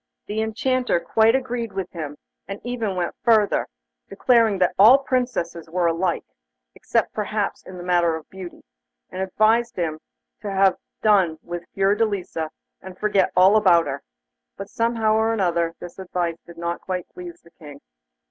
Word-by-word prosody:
The 215 +1 -2
Enchanter 245 0 0
quite 220 +6 +3
agreed 245 -4 -3
with 190 -2 -4
him, 150 -4 -6 0.3
and 195 +1 -6
even 230 -5 -3
went 175 -1 -2
further, 220 -4 +3 0.4
declaring 225 0 +3
that 180 -1 +2
all 225 +7 +9
Princesses 210 -12 -2
were 175 +1 0
alike, 170 +1 0 0.5
except - - -1
perhaps - - -2
in 185 - -9
the 175 - -8
matter 175 -2 +2
of 160 -1 -9
beauty, 185 -2 -10 0.5
and 185 - -5
advised 220 +5 +2
him 160 -3 -2 0.4
to 205 - -5
have 195 -1 +3 0.3
done 190 -7 +3
with 175 0 -7
Fiordelisa, 195 -5 0 0.3
and 185 -1 -10
forget 205 -2 +1
all 185 +3 +6
about 180 -6 +5
her. 140 0 -4 0.6
But, 195 +1 -8
somehow 230 -1 +1
or 220 0 +1
other, 170 -2 0
this 175 +2 -10
advice 175 -3 -3
did 170 0 -13
not 170 0 -3
quite 185 -2 -4
please 175 -1 -9
the 170 - -20
King. 145 -3 -13
190 Hz, 155 wpm, -23 LUFS, 170-220 Hz, 0.6 s, all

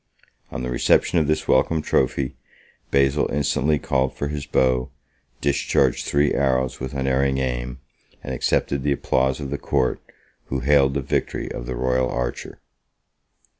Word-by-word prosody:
On - - -5
the 60 - -3
reception 85 +7 +3
of 75 - 0
this 75 0 0
welcome 80 -2 +2
trophy, 65 0 0 0.5
Basil 70 +1 +2
instantly 75 +1 +1
called 65 -1 0
for 70 - -3
his 75 -1 -5
bow, 65 -1 +1 0.5
discharged 70 -2 +1
three 70 0 +2
arrows 65 -1 0
with 65 +2 -5
unerring 65 0 +1
aim, 65 -1 -3 0.4
and 65 - -4
accepted 70 +2 0
the 70 +1 +1
applause 65 -1 0
of 70 -2 -5
the 70 - -3
court, 65 - 0 0.4
who 65 -1 -3
hailed 70 0 +3
the 70 - 0
victory - - -2
of - - -6
the 65 - -3
royal 65 +1 +1
archer. 60 0 -4
65 Hz, 150 wpm, -23 LUFS, 65-70 Hz, 0.5 s, reception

